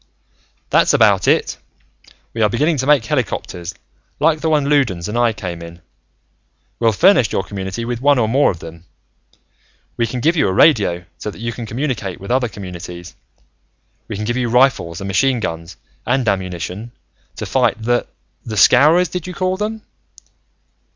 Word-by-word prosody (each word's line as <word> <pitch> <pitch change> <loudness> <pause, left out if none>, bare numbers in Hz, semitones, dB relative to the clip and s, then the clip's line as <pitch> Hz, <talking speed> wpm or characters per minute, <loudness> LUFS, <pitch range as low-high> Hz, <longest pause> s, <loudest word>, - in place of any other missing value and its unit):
"That's - - +4
about - - +4
it. - - +2 0.8
We 115 - -3
are 105 - +4
beginning 150 +8 +1
to 130 +1 -2
make 145 -6 +4
helicopters, 95 - -3 0.4
like 155 +1 +2
the 160 - 0
one 150 -3 +2
Loudons 120 -13 +1
and 105 - -5
I 120 -1 +3
came 90 -5 -6
in. 85 0 -10 1.0
We'll 115 -1 +3
furnish 130 - +4
your 95 - -1
community 100 +3 -5
with 120 0 -4
one 145 0 +4
or 115 -3 +2
more 135 +6 +3
of 90 - -3
them. 80 +1 -11 1.1
We 115 - +1
can 125 +3 -4
give 160 +8 +2
you 160 - +2
a 95 - 0
radio, 95 - +3
so - - -4
that - - -10
you 115 +2 -4
can 115 +1 -7
communicate 115 -6 -3
with 100 +5 -7
other 125 -1 +2
communities. 90 -4 -9 0.9
We - - -5
can 105 +2 -4
give 120 +3 -1
you 125 -2 -1
rifles 120 -10 +2
and 100 - -5
machine 125 +6 +1
guns 85 -3 -5 0.3
and 125 0 0
ammunition, 95 +3 -3 0.4
to - - -5
fight 110 - +1
the 120 +2 0 0.4
the 110 -2 -6
Scowrers, 150 - +5
did 180 0 -5
you 180 - -7
call 185 0 0
them? 215 +2 -4
115 Hz, 170 wpm, -18 LUFS, 95-140 Hz, 1.1 s, Scowrers